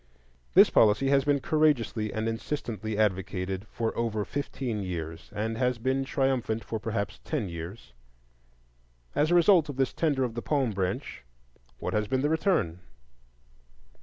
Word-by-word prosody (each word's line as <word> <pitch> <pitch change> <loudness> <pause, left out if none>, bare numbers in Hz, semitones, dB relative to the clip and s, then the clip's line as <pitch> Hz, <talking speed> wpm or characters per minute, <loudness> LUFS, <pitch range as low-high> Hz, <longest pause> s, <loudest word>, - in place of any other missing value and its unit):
This - - +8
policy 110 +5 +4
has 140 0 +3
been 145 -1 +2
courageously 135 -9 +1
and 110 +1 -2
insistently 115 -3 -3
advocated 95 -1 -1
for 115 +1 -3
over 110 -3 -1
fifteen 130 -6 -3
years, 80 -4 -5
and 110 +2 -3
has 125 -1 +1
been 130 +3 0
triumphant 130 -5 0
for 110 - -4
perhaps 105 0 -3
ten 140 -10 -2
years. 85 - -8 1.2
As 150 +2 +2
a 175 - +4
result 175 -3 +5
of 145 - -4
this 135 0 0
tender 145 -5 +1
of 120 -3 -2
the 120 - -4
palm 135 -5 0
branch, 95 -7 -3 0.5
what - - -4
has 105 0 0
been 130 +2 0
the 145 - +2
return? 160 - +1
115 Hz, 150 wpm, -28 LUFS, 105-135 Hz, 1.2 s, This